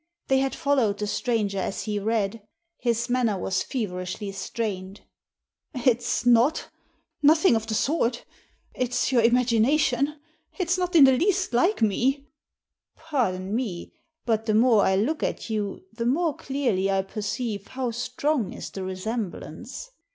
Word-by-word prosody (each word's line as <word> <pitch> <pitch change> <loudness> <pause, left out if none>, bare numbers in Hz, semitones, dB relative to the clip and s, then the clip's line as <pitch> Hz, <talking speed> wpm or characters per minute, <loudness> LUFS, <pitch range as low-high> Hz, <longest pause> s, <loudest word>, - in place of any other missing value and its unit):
They 265 0 +4
had 270 0 -1
followed 270 -9 +1
the 210 - -2
stranger 210 -3 -1
as 190 - -3
he 210 -1 -2
read. 220 0 -1 0.4
His 235 -1 0
manner 245 -5 +1
was 185 0 -1
feverishly 195 -3 -4
strained. 195 -1 -4 0.4
" - - -30
It's 245 -1 +1
not 245 +6 +3 0.5
Nothing 310 -1 +5
of 225 0 -2
the 220 - -1
sort 250 -3 0 0.5
It's 250 +1 -1
your 245 -3 +4
imagi 235 -1 +3
nation. 280 +2 +2 0.4
It's 360 -2 +1
not 360 -1 -2
in 310 - +9
the 265 - +8
least 375 +2 +1
like 350 - +2
me." 245 +6 +2
•* 280 - -24 0.7
Pardon 205 -12 -2
me, 210 -9 -4 0.3
but 225 -1 0
the 215 - +2
more 225 -1 +5
I 190 - +3
look 255 +11 0
at - - -3
you 205 -3 -3
the 230 +1 -2
more 310 +3 +1
clearly 240 -9 -1
I 195 0 +1
perceive 205 +1 -4
how 255 -2 -3
strong 250 +1 -1
is - - -8
the 195 - -6
resemblance. 215 - -5
235 Hz, 150 wpm, -25 LUFS, 205-270 Hz, 0.7 s, in